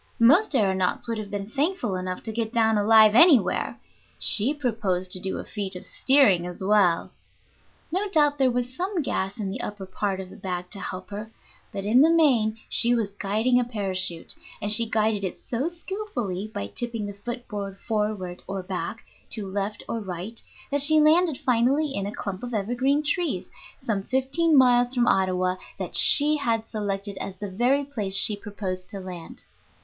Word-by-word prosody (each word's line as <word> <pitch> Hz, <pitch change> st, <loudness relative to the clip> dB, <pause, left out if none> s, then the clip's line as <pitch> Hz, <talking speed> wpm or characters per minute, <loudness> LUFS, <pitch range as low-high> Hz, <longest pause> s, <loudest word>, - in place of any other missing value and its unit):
Most 290 Hz, -, +4 dB
aëronauts 190 Hz, -1 st, 0 dB
would 230 Hz, -1 st, -3 dB
have 210 Hz, -2 st, -7 dB
been 200 Hz, -1 st, -5 dB
thankful 275 Hz, -, -1 dB
enough 185 Hz, 0 st, -5 dB
to 225 Hz, -, -4 dB
get 220 Hz, 0 st, -3 dB
down 225 Hz, -2 st, +2 dB
alive 215 Hz, +1 st, +5 dB
anywhere; 265 Hz, -, +4 dB, 0.4 s
she 225 Hz, +6 st, +3 dB
proposed 215 Hz, -10 st, -2 dB
to 185 Hz, -, +2 dB
do 190 Hz, +1 st, -3 dB
a -, -, -5 dB
feat 200 Hz, -3 st, -4 dB
of 180 Hz, -, -8 dB
steering 215 Hz, -11 st, +3 dB
as 180 Hz, +1 st, -8 dB
well. 190 Hz, -4 st, +2 dB, 0.8 s
No 390 Hz, +4 st, -1 dB
doubt 295 Hz, -5 st, +2 dB
there 265 Hz, -1 st, +3 dB
was 245 Hz, +1 st, -2 dB
some 365 Hz, -1 st, -2 dB
gas 195 Hz, -4 st, -3 dB
in 195 Hz, -2 st, -3 dB
the -, -, -4 dB
upper 205 Hz, -2 st, -6 dB
part 190 Hz, +1 st, -3 dB
of 190 Hz, -1 st, -8 dB
the -, -, -12 dB
bag 180 Hz, -1 st, -6 dB
to 200 Hz, -, -7 dB
help 185 Hz, +1 st, -7 dB
her, 210 Hz, +2 st, -7 dB, 0.4 s
but 200 Hz, -2 st, -6 dB
in 235 Hz, +5 st, +4 dB
the 315 Hz, -, +5 dB
main 255 Hz, -10 st, +2 dB
she 240 Hz, +1 st, +2 dB
was 220 Hz, -4 st, -2 dB
guiding 215 Hz, +5 st, 0 dB
a -, -, +1 dB
parachute; 185 Hz, -7 st, -2 dB, 0.3 s
and 205 Hz, 0 st, 0 dB
she 225 Hz, +1 st, +6 dB
guided 215 Hz, -2 st, 0 dB
it 185 Hz, -, -4 dB
so 260 Hz, +7 st, -3 dB
skilfully 335 Hz, -, -5 dB
by 100 Hz, -, -5 dB
tipping 225 Hz, -, -4 dB
the 205 Hz, -, -6 dB
foot 240 Hz, +4 st, -8 dB
board 200 Hz, -2 st, -6 dB
forward 210 Hz, -5 st, -3 dB
or 195 Hz, -1 st, -5 dB
back, 185 Hz, 0 st, -5 dB, 0.3 s
to 215 Hz, -3 st, -3 dB
left 200 Hz, +2 st, -4 dB
or 230 Hz, -, -3 dB
right, 195 Hz, +3 st, -7 dB, 0.3 s
that 285 Hz, 0 st, +2 dB
she 310 Hz, +2 st, +6 dB
landed 315 Hz, 0 st, +3 dB
finally 265 Hz, +5 st, +1 dB
in 200 Hz, 0 st, -3 dB
a -, -, -5 dB
clump 195 Hz, -3 st, -6 dB
of 245 Hz, -2 st, -5 dB
evergreen 250 Hz, +8 st, 0 dB
trees, 340 Hz, +3 st, -2 dB, 0.3 s
some 210 Hz, -4 st, -2 dB
fifteen 270 Hz, -, +1 dB
miles 245 Hz, -1 st, +4 dB
from 240 Hz, -1 st, +2 dB
Ottawa, 185 Hz, -2 st, +1 dB, 0.2 s
that -, -, -3 dB
she 300 Hz, +1 st, +8 dB
had 230 Hz, -6 st, -1 dB
selected 200 Hz, -2 st, -4 dB
as 195 Hz, -, -6 dB
the 205 Hz, -2 st, -7 dB
very 250 Hz, +8 st, +1 dB
place 210 Hz, -9 st, -1 dB
she 210 Hz, +1 st, +6 dB
proposed 195 Hz, -3 st, -7 dB
to 200 Hz, -, -7 dB
land. 180 Hz, -3 st, -8 dB
215 Hz, 185 wpm, -24 LUFS, 195-255 Hz, 0.8 s, she